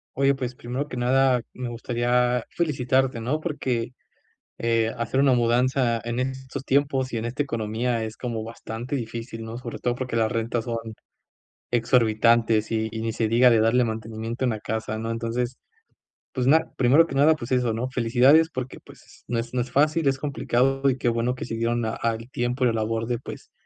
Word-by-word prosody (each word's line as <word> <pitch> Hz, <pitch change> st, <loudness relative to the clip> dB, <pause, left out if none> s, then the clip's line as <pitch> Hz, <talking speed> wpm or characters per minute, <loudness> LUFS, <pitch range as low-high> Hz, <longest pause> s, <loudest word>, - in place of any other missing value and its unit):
Oye, 140 Hz, +1 st, +3 dB
pues 130 Hz, -2 st, -4 dB
primero 125 Hz, +4 st, -4 dB
que -, -, -7 dB
nada 125 Hz, 0 st, +3 dB
me 125 Hz, -1 st, -5 dB
gustaría 120 Hz, +1 st, 0 dB
felicitarte, 130 Hz, -5 st, +1 dB
¿no? 130 Hz, +7 st, -1 dB
Porque, 125 Hz, -7 st, -2 dB, 0.7 s
eh, 115 Hz, -1 st, +1 dB
hacer 115 Hz, +2 st, -1 dB
una 135 Hz, -1 st, +5 dB
mudanza 120 Hz, 0 st, +2 dB
en 120 Hz, +1 st, -3 dB
estos 130 Hz, +1 st, -4 dB
tiempos 135 Hz, -1 st, +1 dB
y 115 Hz, -, -2 dB
en 110 Hz, -, -3 dB
esta 120 Hz, +5 st, -2 dB
economía 115 Hz, -2 st, -1 dB
es 110 Hz, 0 st, -6 dB
como 115 Hz, -3 st, -4 dB
bastante 115 Hz, +3 st, -6 dB
difícil, 115 Hz, -2 st, -5 dB
¿no? 115 Hz, +1 st, -6 dB
Sobre 120 Hz, -2 st, -7 dB
todo 120 Hz, 0 st, 0 dB
porque 125 Hz, -2 st, -4 dB
las 110 Hz, 0 st, +2 dB
rentas 115 Hz, 0 st, -1 dB
son 115 Hz, -1 st, -2 dB, 0.9 s
exorbitantes 115 Hz, -2 st, +3 dB
y 110 Hz, -1 st, 0 dB
y 110 Hz, 0 st, -4 dB
ni 115 Hz, -1 st, -2 dB
se 110 Hz, -, 0 dB
diga 120 Hz, +3 st, +5 dB
de 115 Hz, -, +4 dB
darle 115 Hz, +3 st, +3 dB
mantenimiento 115 Hz, +2 st, -3 dB
en -, -, +2 dB
la 110 Hz, -2 st, -2 dB
casa, 110 Hz, 0 st, -3 dB
¿no? 115 Hz, +1 st, -3 dB
Entonces, 120 Hz, +2 st, -2 dB, 0.8 s
pues 130 Hz, -1 st, 0 dB
na 160 Hz, +3 st, +3 dB
primero 135 Hz, +6 st, +5 dB
que -, -, -7 dB
nada, 150 Hz, +3 st, +5 dB
pues 120 Hz, -3 st, -6 dB
eso, 125 Hz, -2 st, +2 dB
¿no? 115 Hz, +3 st, -2 dB
Felicidades 130 Hz, +6 st, +4 dB
porque, 130 Hz, -3 st, -5 dB
pues, -, -, -16 dB
s -, -, -19 dB
no 120 Hz, -, -1 dB
es 115 Hz, +1 st, -4 dB
no 125 Hz, -, +1 dB
es 125 Hz, +1 st, -3 dB
fácil, 150 Hz, +3 st, +2 dB
es 135 Hz, 0 st, +1 dB
complicado, 135 Hz, -1 st, +1 dB
y 130 Hz, -, -2 dB
qué 120 Hz, -, 0 dB
bueno 120 Hz, +2 st, 0 dB
que -, -, -5 dB
se 115 Hz, -, -5 dB
dieron 115 Hz, +1 st, 0 dB
a 110 Hz, -, -1 dB
al 115 Hz, 0 st, -2 dB
tiempo 120 Hz, +2 st, -1 dB
y -, -, +5 dB
la -, -, +1 dB
labor 115 Hz, 0 st, -1 dB
de, 120 Hz, -1 st, -1 dB
pues -, -, -10 dB
120 Hz, 200 wpm, -25 LUFS, 115-130 Hz, 0.9 s, una